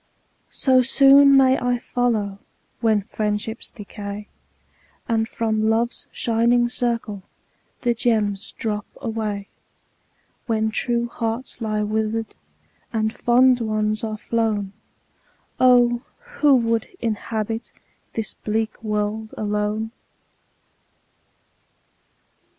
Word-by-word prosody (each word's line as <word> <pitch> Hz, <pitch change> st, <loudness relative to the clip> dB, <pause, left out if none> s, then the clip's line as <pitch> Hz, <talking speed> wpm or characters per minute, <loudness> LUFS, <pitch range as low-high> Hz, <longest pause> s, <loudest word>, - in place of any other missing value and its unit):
So 260 Hz, -2 st, +3 dB
soon 275 Hz, +2 st, +7 dB
may 265 Hz, 0 st, +5 dB
I 245 Hz, 0 st, +1 dB
follow, 220 Hz, -5 st, -1 dB, 0.4 s
When 220 Hz, -3 st, +2 dB
friendships 210 Hz, +1 st, -3 dB
decay, 205 Hz, -1 st, -8 dB, 0.8 s
And 225 Hz, -1 st, 0 dB
from 220 Hz, -1 st, 0 dB
Love's 230 Hz, +2 st, 0 dB
shining 235 Hz, +1 st, +2 dB
circle 235 Hz, -5 st, -2 dB, 0.6 s
The 240 Hz, -1 st, +3 dB
gems 220 Hz, -3 st, 0 dB
drop 210 Hz, -1 st, -3 dB
away. 215 Hz, -5 st, -3 dB, 1.0 s
When 220 Hz, -1 st, +1 dB
true 235 Hz, +1 st, 0 dB
hearts 230 Hz, +2 st, -4 dB
lie 215 Hz, -1 st, -1 dB
wither'd, 220 Hz, +1 st, -1 dB, 0.6 s
And 220 Hz, -1 st, 0 dB
fond 250 Hz, +1 st, +4 dB
ones 215 Hz, -1 st, 0 dB
are 215 Hz, -1 st, -3 dB
flown, 215 Hz, -3 st, -1 dB, 0.9 s
Oh! 245 Hz, -1 st, +5 dB, 0.4 s
who 290 Hz, -2 st, +6 dB
would 230 Hz, -2 st, +1 dB
inhabit 225 Hz, 0 st, -3 dB, 0.4 s
This 225 Hz, -1 st, -3 dB
bleak 220 Hz, +1 st, -3 dB
world 215 Hz, +1 st, -2 dB
alone 210 Hz, +1 st, -1 dB
225 Hz, 95 wpm, -22 LUFS, 215-240 Hz, 1.0 s, soon